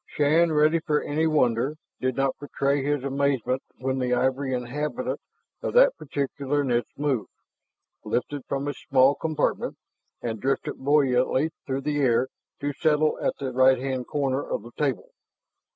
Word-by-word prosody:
Shann, 160 +3 +3
ready 155 +2 +4
for 150 -1 0
any 155 +2 0
wonder, 135 -2 +2 0.2
did 130 -1 -1
not 135 -1 +1
betray 140 -1 0
his 145 -1 0
amazement 135 -2 0 0.2
when 130 +1 -2
the 125 -1 +1
ivory 130 +1 0
inhabitant 150 - -3 0.4
of - - -3
that - - +6
particular 140 0 -2
niche 120 -3 0
moved, 140 -6 -1 0.7
lifted 140 +2 -2
from 140 +1 -2
its 145 - -4
small 135 0 +6
compartment, 155 +1 -1 0.4
and 110 -3 -4
drifted 135 +1 -1
buoyantly 135 +1 +2 0.2
through 135 0 -1
the 145 +1 -1
air 130 0 +3 0.3
to 145 0 -1
settle 155 +1 +2
at - - 0
the 135 -2 -3
right 130 +1 +5
hand 130 -1 -3
corner 140 -2 0
of - - -4
the 120 - -11
table. 140 -5 -1
140 Hz, 150 wpm, -26 LUFS, 130-150 Hz, 0.7 s, that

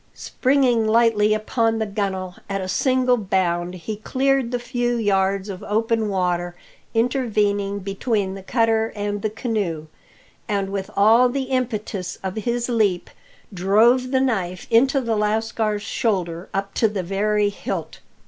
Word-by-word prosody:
Springing 255 -4 +1
lightly 220 -2 +3
upon 225 +1 +1
the 220 - -1
gunle, 190 -3 -3
at 195 0 -1
a 185 - -4
single 255 +4 +2
bound 180 -3 -1
he 185 +5 -6
cleared 265 +2 0
the 245 - -1
few 245 0 -1
yards 195 -3 +1
of 190 -2 -6
open 225 0 0
water 175 -2 -1 0.4
intervening 210 -5 +1
between 200 0 -2
the 195 - -8
cutter 225 +2 +1
and 205 0 -3
the 215 - 0
canoe, 205 -8 -3 0.6
and 200 -3 -1
with 195 -1 -3
all 225 +5 +5
the 270 +2 -2
impetus 215 -7 -2
of 190 -1 -3
his 235 +2 -1
leap 215 -7 0 0.4
drove 220 +7 +3
the 260 0 +2
knife 190 -9 -1
into 265 +4 +4
the 230 -3 -1
lascar's 215 0 0
shoulder 180 -8 -2
up 195 0 -3
to 225 - +3
the 205 -3 -3
very 205 +3 +1
hilt. 205 - -5
210 Hz, 145 wpm, -22 LUFS, 195-235 Hz, 0.6 s, all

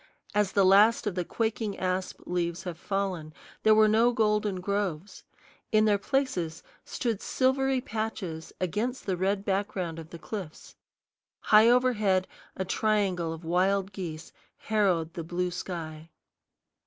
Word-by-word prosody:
As 210 -2 +1
the 200 -2 +4
last 210 +5 +5
of 210 - -1
the 180 0 -1
quaking 220 +1 -2
asp 185 0 -2
leaves 170 -1 -2
have 175 -3 -6
fallen, 185 -6 -3 0.3
there 215 0 +5
were 215 0 +6
no 225 +3 +4
golden 210 -3 +1
groves. 200 -2 -3 0.5
In 215 0 +4
their 205 -2 +3
places 185 - -1 0.2
stood 230 -5 -3
silvery 265 0 +1
patches 215 -8 -4
against 215 +9 -2
the 190 - 0
red 195 +2 -1
background 190 -4 -2
of 160 -1 -10
the 170 - -9
cliffs. 185 -3 -8 0.7
High 215 +2 +6
overhead 215 -7 +3 0.3
a 190 - -3
triangle 195 -4 0
of 165 +1 -7
wild 190 +3 +1
geese 170 -5 -7 0.2
harrowed 185 -7 0
the 170 - -5
blue 180 +2 -2
sky. 165 -3 -6
195 Hz, 140 wpm, -28 LUFS, 175-215 Hz, 0.7 s, were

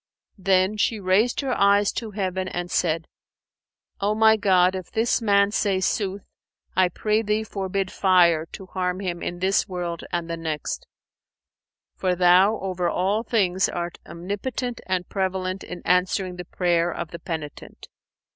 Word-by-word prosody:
Then 190 +2 +2
she 215 +1 +1
raised 200 +7 +2
her 270 -2 -1
eyes 200 0 +4
to 225 - -5
heaven 190 -2 -2
and 175 -1 -4
said, 165 -2 0 0.9
'O 205 +2 +1
my 220 0 +6
God, 185 -3 +3
if 185 -2 -6
this 230 +2 +1
man 200 -2 +3
say 200 -3 +1
sooth, 195 0 -1 0.5
I 185 -1 +4
pray 215 +5 0
Thee 215 0 0
forbid 195 -2 -3
fire 170 -4 +3
to 190 - -10
harm 185 -1 -2
him 180 -3 -4
in 175 - -4
this 190 +2 +1
world 175 -2 -4
and 170 -1 -2
the 170 0 -4
next, 160 -3 -4 1.1
for 185 -1 0
Thou 180 +4 +5
over 180 -2 -1
all 195 +6 0
things 200 -5 +1
art 175 -1 -4
Omnipotent 210 +7 -4
and 185 -1 -1
Prevalent 190 -1 -2
in 180 - -8
answering 180 0 +1
the 180 - -6
prayer 175 -1 +1
of 165 - -5
the 170 - -7
penitent!' 160 -4 -7
185 Hz, 155 wpm, -24 LUFS, 175-200 Hz, 1.1 s, my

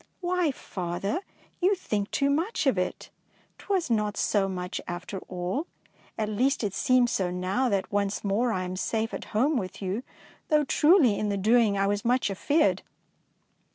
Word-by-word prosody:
"Why, 360 -2 +1
father, 195 - -3 0.4
you 380 +3 +3
think 210 - -2
too 280 0 +1
much 330 +6 0
of 270 - +3
it; 180 -1 -3 0.5
'twas 370 -9 -1
not 210 -2 0
so 195 -2 +1
much 180 -1 -4
after 180 +3 -5
all. 185 - -3 0.5
At 215 - -1
least 250 +6 +1
it 200 -3 -1
seems 250 +1 +3
so 185 -2 0
now 185 +8 0
that 200 -3 -1
once 200 0 -1
more 215 +5 +1
I 185 -4 -1
am 180 0 -4
safe 225 +3 -1
at - - -5
home 265 +7 +1
with 190 -3 -4
you, 195 +3 -2 0.5
though 300 -1 +3
truly 295 - +4
in 210 - -1
the 200 - 0
doing 215 0 +3
I 195 - +2
was 205 0 0
much 245 -3 +2
af 195 - -9
eared." 305 +2 +3
210 Hz, 175 wpm, -27 LUFS, 195-275 Hz, 0.5 s, truly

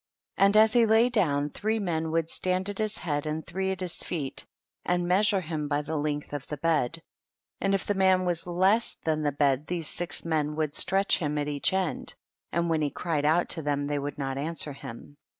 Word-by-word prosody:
4. 195 - +5
And 200 +2 +3
as 220 0 +6
he 235 -2 +5
lay 225 +3 +5
down, 150 -11 +1
three 220 +2 -1
men 165 -6 -1
would 165 0 0
stand 185 +3 -1
at 205 - -6
his 215 -1 -1
head 145 -2 -2
and 155 +1 -3
three 190 +2 -2
at 190 0 -5
his 180 -2 -4
feet, 145 -6 -3 0.4
and 175 0 0
measure 195 +2 +3
him 155 -3 -3
by 145 0 0
the 155 +2 -4
length 145 -1 -2
of 145 -2 -5
the 150 - -5
bed, 165 0 0 0.6
and 195 0 +1
if 195 - -2
the 205 - +1
man 190 -1 +3
was 175 -1 -1
less 190 +6 +2
than 155 -1 0
the 145 -1 +1
bed 140 0 +1
these 170 -3 -1
six 175 +1 -2
men 150 -2 0
would 155 -2 -1
stretch 195 +5 +2
him 150 -3 -1
at 145 0 -1
each 145 -1 +1
end, 190 -3 -2 0.4
and 170 +1 0
when 160 -2 +1
he 150 - +1
cried 155 -2 -2
out 165 +3 +3
to 165 - +4
them 145 -1 -1
they 145 0 -1
would 145 0 -5
not 135 -1 -3
answer 150 -1 -2
him. 135 +2 -10
165 Hz, 220 wpm, -27 LUFS, 145-190 Hz, 0.6 s, as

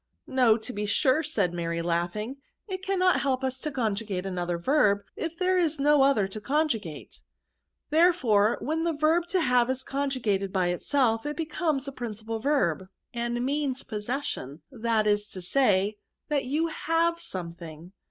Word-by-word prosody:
" - - -49
No, 245 -4 +4
to 235 +3 -6
be 210 -1 -3
sure," 260 +8 +3
said 210 - 0
Mary, 170 -1 -2
laughing; 175 +9 -2 0.2
" - - -55
it 375 -2 -4
cannot 375 -1 +2
help 265 -1 0
us 260 0 -1
to 300 - -3
conjugate 215 -7 -2
another 175 -2 -2
verb, 205 - +2
if 330 0 -4
there 370 +1 +2
is 320 -4 +1
no 295 0 +4
other 270 -8 +4
to 210 +2 -8
conjugate." 225 - -2 0.7
Therefore, 260 - +4
when 320 +3 -1
the 335 -1 +1
verb 315 +3 +2
to 375 - 0
liave 250 -7 +3
is 260 0 -1
con 280 +1 -2
jugated 205 -7 -1
by 185 -2 +1
itself, 225 +4 +1
it 295 - -4
becomes 310 -3 -1
a - - -3
principal 225 -3 -5
verb, 225 - +1
VERBS. 190 - -13 0.3
S5S 240 - -5
and 240 +1 -1
means 275 -1 -1
possession^ 210 - -4
that 230 -3 0
is 205 0 +1
to 195 - -9
say^ 205 0 +2 0.3
that 290 -3 0
you 300 +6 0
have 330 +1 0
something." 170 - -7
250 Hz, 175 wpm, -27 LUFS, 200-295 Hz, 0.7 s, No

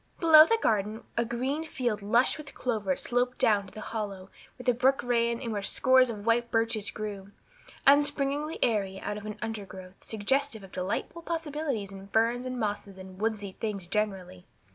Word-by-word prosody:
Below 315 -2 +9
the 455 - +3
garden 215 - 0
a 235 - +2
green 255 +6 -2
field 240 -9 -2
lush 235 +8 +3
with 285 -2 -10
clover 215 -7 -1
sloped 245 +4 0
down 205 -2 +3
to - - -14
the 215 - -7
hollow 200 -4 -5 0.3
where 250 - -10
the 250 - +4
brook 260 +3 +2
ran 235 -1 +1
and 235 -3 -4
where 205 -2 -2
scores 260 +5 +4
of 210 -3 -6
white 235 +1 +2
birches 225 -2 0
grew, 205 -2 -6 0.6
upspringing 290 +2 +3
airily 195 -4 0
out 210 - -4
of 210 0 -7
an 210 0 -6
undergrowth 195 -4 -7
suggestive 225 +2 0
of 190 - -12
delightful 190 - -3
possibilities 300 - -3
in 195 0 -10
ferns 230 +4 +1
and 255 -1 -4
mosses 205 -3 -3
and 185 0 -11
woodsy 215 -3 -1
things 200 -2 -4
generally. 185 -2 -3
225 Hz, 175 wpm, -28 LUFS, 200-255 Hz, 0.6 s, Below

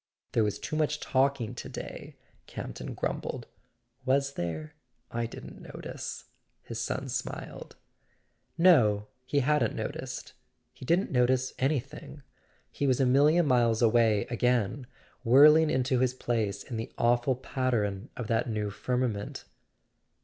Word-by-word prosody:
"There 115 - +2
was 105 -1 -1
too - - -5
much 150 -1 0
talking 135 -4 +1
to - - -7
day," - - -8 0.3
Campton - - -7
grumbled. - - -3 0.6
"Was 140 +1 +1
there? 80 - -4 0.4
I 115 0 -2
didn't - - -10
notice," - - -7 0.4
his 115 -1 -5
son 130 +3 -3
smiled. 130 0 -6 0.8
No—he 130 - +3
hadn't 150 +3 +1
noticed; - - -5 0.4
he - - -11
didn't 175 +8 +1
notice 130 0 +2
anything. 140 +1 -3 0.5
He 140 - -1
was 130 -1 +2
a 135 - +4
million 150 +6 +4
miles 120 -4 +3
away 115 -3 +4
again, 125 +1 0 0.4
whirling 150 +6 +7
into 130 -1 +1
his 130 0 +1
place 110 -6 -2
in 120 - -6
the 110 - -5
awful 120 +2 +2
pattern 120 -5 -2
of 120 - -3
that 115 +2 0
new' 105 -2 -2
firmament. 125 -2 -2
125 Hz, 130 wpm, -29 LUFS, 115-140 Hz, 0.8 s, whirling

